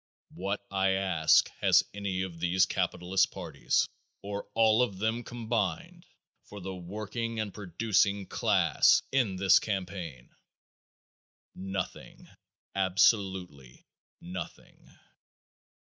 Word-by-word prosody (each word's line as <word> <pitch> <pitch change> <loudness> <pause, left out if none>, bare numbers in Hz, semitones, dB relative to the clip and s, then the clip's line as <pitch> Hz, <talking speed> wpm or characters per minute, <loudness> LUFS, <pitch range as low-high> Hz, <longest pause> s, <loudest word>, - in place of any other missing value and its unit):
What, 100 +2 -4
I 95 0 +2
ask, 95 -5 +3
has - - +5
any 100 -2 -2
of 85 -3 -7
these 90 +2 +3
capitalist 95 +2 0
parties, - - -1 0.4
or 100 0 -5
all 110 0 +4
of 100 -6 0
them 110 +4 -1
combined, 115 -8 -3 0.4
for 105 - -9
the 95 0 -6
working 110 +5 -5
and 105 -3 -3
producing 100 0 0
class - - +3
in 120 -8 +1
this 95 0 +5
campaign? 90 - -5 1.2
Nothing. 95 0 -6 0.5
Absolutely 95 - 0 0.3
nothing. 90 0 -9
95 Hz, 100 wpm, -29 LUFS, 90-105 Hz, 1.2 s, has